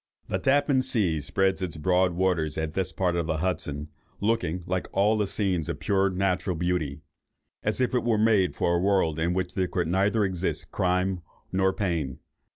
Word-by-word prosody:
The 95 Hz, -, 0 dB
Tappan 140 Hz, +3 st, +3 dB
Sea 105 Hz, -11 st, 0 dB
spreads 95 Hz, +7 st, 0 dB
its 85 Hz, -3 st, -3 dB
broad 90 Hz, +2 st, +2 dB
waters 85 Hz, -4 st, 0 dB
at 80 Hz, -1 st, -2 dB
this 95 Hz, 0 st, -1 dB
part 90 Hz, -2 st, 0 dB
of 85 Hz, -2 st, -1 dB
the 80 Hz, -, 0 dB
Hudson, 75 Hz, -4 st, -2 dB, 0.3 s
looking, 100 Hz, -5 st, 0 dB
like 90 Hz, 0 st, -2 dB
all 105 Hz, +2 st, +2 dB
scenes 95 Hz, -6 st, -1 dB
of -, -, -3 dB
pure 100 Hz, -1 st, +2 dB
natural 95 Hz, 0 st, 0 dB
beauty, 80 Hz, -4 st, -1 dB, 0.6 s
as -, -, -1 dB
if 130 Hz, -1 st, +1 dB
it 125 Hz, -, +2 dB
was 115 Hz, -3 st, +2 dB
made 105 Hz, -4 st, +3 dB
for 85 Hz, -, +1 dB
a 85 Hz, -, +2 dB
world 95 Hz, -5 st, +2 dB
in 85 Hz, +2 st, 0 dB
which 95 Hz, -1 st, -2 dB
there 95 Hz, -1 st, 0 dB
could 90 Hz, -2 st, -1 dB
neither 100 Hz, +4 st, +2 dB
exist 95 Hz, -1 st, -3 dB
crime 90 Hz, 0 st, 0 dB, 0.3 s
nor 95 Hz, 0 st, +2 dB
pain. 85 Hz, -10 st, -2 dB
95 Hz, 180 wpm, -27 LUFS, 85-100 Hz, 0.6 s, Tappan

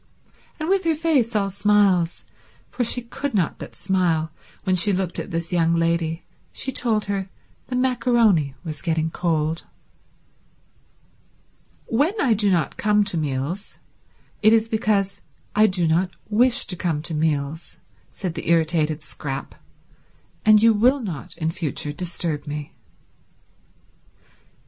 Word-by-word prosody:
And 310 Hz, -, -3 dB
with 385 Hz, +1 st, +2 dB
her 325 Hz, -1 st, +2 dB
face 290 Hz, -8 st, +1 dB
all 200 Hz, -2 st, +1 dB
smiles, 200 Hz, -4 st, +2 dB, 0.5 s
for 250 Hz, -, -1 dB
she 245 Hz, +1 st, +2 dB
could 265 Hz, +2 st, -4 dB
not 180 Hz, -6 st, 0 dB
but -, -, -9 dB
smile 175 Hz, -5 st, 0 dB, 0.3 s
when 185 Hz, -2 st, +2 dB
she 185 Hz, +3 st, +3 dB
looked 185 Hz, -2 st, -1 dB
at -, -, -5 dB
this 165 Hz, +1 st, -3 dB
young 165 Hz, -1 st, +3 dB
lady, 165 Hz, 0 st, 0 dB, 0.3 s
she 265 Hz, -, -4 dB
told 225 Hz, -6 st, +1 dB
her 195 Hz, -1 st, -3 dB, 0.4 s
the 250 Hz, -, -3 dB
maccaroni 235 Hz, -, +2 dB
was 155 Hz, -3 st, -6 dB
getting 160 Hz, -2 st, 0 dB
cold. 160 Hz, -2 st, -1 dB, 2.2 s
"When 305 Hz, -, +1 dB
I 250 Hz, -5 st, +3 dB
do 210 Hz, -1 st, +2 dB
not 175 Hz, -4 st, 0 dB
come 210 Hz, 0 st, +3 dB
to 200 Hz, -, -4 dB
meals 150 Hz, +6 st, -3 dB, 0.6 s
it 215 Hz, +1 st, +6 dB
is 225 Hz, 0 st, +3 dB
because 215 Hz, -4 st, 0 dB, 0.3 s
I 215 Hz, +1 st, +6 dB
do 180 Hz, -3 st, 0 dB
not 170 Hz, +4 st, +2 dB, 0.2 s
wish 245 Hz, +4 st, +4 dB
to 180 Hz, -, -3 dB
come 165 Hz, -4 st, -2 dB
to 165 Hz, -, -5 dB
meals," 150 Hz, 0 st, -2 dB, 0.3 s
said 185 Hz, -4 st, -5 dB
the 165 Hz, -, -5 dB
irritated 160 Hz, -2 st, +2 dB
Scrap, 135 Hz, -3 st, -6 dB, 0.9 s
"and 215 Hz, 0 st, +6 dB
you 230 Hz, 0 st, +7 dB
will 250 Hz, +7 st, +3 dB
not 175 Hz, -, -6 dB
in 160 Hz, -1 st, -1 dB
future 150 Hz, -3 st, -3 dB
disturb 165 Hz, -3 st, -3 dB
me." 145 Hz, 0 st, -5 dB
185 Hz, 140 wpm, -23 LUFS, 160-220 Hz, 2.2 s, you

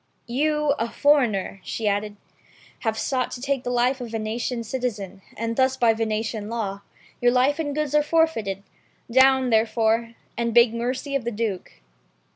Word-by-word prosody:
"You, 300 Hz, +4 st, +1 dB
a 230 Hz, +1 st, -1 dB
foreigner," 235 Hz, -11 st, +2 dB
she 220 Hz, -, -3 dB
added, 205 Hz, +1 st, -1 dB, 0.6 s
"have 220 Hz, -2 st, -1 dB
sought 255 Hz, +2 st, -1 dB
to -, -, -6 dB
take 270 Hz, 0 st, -1 dB
the -, -, -3 dB
life 250 Hz, +2 st, +1 dB
of 245 Hz, -, -4 dB
a -, -, -11 dB
Venetian 230 Hz, +2 st, -3 dB
citizen, 215 Hz, -5 st, -4 dB, 0.2 s
and 230 Hz, +1 st, -2 dB
thus 260 Hz, +1 st, +2 dB
by 235 Hz, -3 st, +4 dB
the -, -, -9 dB
Venetian 220 Hz, -1 st, -2 dB
law, 205 Hz, -4 st, -3 dB, 0.4 s
your 245 Hz, 0 st, +4 dB
life 260 Hz, +5 st, +2 dB
and 290 Hz, -3 st, -2 dB
goods 300 Hz, -2 st, -1 dB
are 300 Hz, -, +5 dB
forfeited. 295 Hz, -, 0 dB, 0.5 s
Down, 260 Hz, 0 st, +5 dB
therefore, 225 Hz, +1 st, +1 dB, 0.2 s
and 235 Hz, -1 st, -2 dB
beg 235 Hz, -1 st, +6 dB
mercy 255 Hz, +4 st, -3 dB
of 275 Hz, -, 0 dB
the 235 Hz, -, -1 dB
Duke." 205 Hz, -, -4 dB
235 Hz, 170 wpm, -24 LUFS, 220-265 Hz, 0.6 s, beg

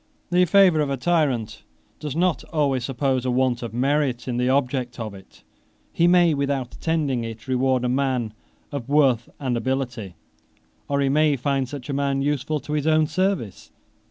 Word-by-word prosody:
The 180 Hz, +1 st, +4 dB
favor 185 Hz, -2 st, +5 dB
of 145 Hz, -, -1 dB
a 135 Hz, -, -1 dB
tyrant 130 Hz, -9 st, 0 dB, 0.4 s
does 150 Hz, -2 st, -5 dB
not 175 Hz, -4 st, +1 dB
always 140 Hz, -6 st, 0 dB
suppose 135 Hz, -1 st, -1 dB
a 130 Hz, -, -1 dB
want 125 Hz, -1 st, +1 dB
of 120 Hz, -3 st, -5 dB
merit 135 Hz, +1 st, 0 dB
in 120 Hz, -1 st, -2 dB
the 125 Hz, +1 st, +1 dB
object 130 Hz, -2 st, 0 dB
of 110 Hz, -3 st, -5 dB
it; 95 Hz, -1 st, -16 dB, 0.5 s
he 170 Hz, -, +3 dB
may, 175 Hz, -2 st, +5 dB
without 140 Hz, -3 st, -2 dB
intending 150 Hz, -7 st, -1 dB
it, 115 Hz, +2 st, -8 dB
reward 130 Hz, -1 st, +1 dB
a -, -, +1 dB
man 125 Hz, -4 st, 0 dB, 0.4 s
of 140 Hz, -3 st, -5 dB
worth 135 Hz, -5 st, +3 dB
and 130 Hz, -3 st, -1 dB
ability, 120 Hz, -5 st, -3 dB, 0.7 s
or 140 Hz, 0 st, 0 dB
he 135 Hz, -, +2 dB
may 150 Hz, +1 st, +3 dB
find 135 Hz, 0 st, -1 dB
such 145 Hz, -2 st, -7 dB
a 140 Hz, -, -3 dB
man 140 Hz, 0 st, 0 dB
useful 145 Hz, +1 st, -1 dB
to 150 Hz, -, -6 dB
his 150 Hz, 0 st, -1 dB
own 155 Hz, 0 st, +4 dB
service. 170 Hz, -, -2 dB
135 Hz, 180 wpm, -23 LUFS, 125-150 Hz, 0.7 s, favor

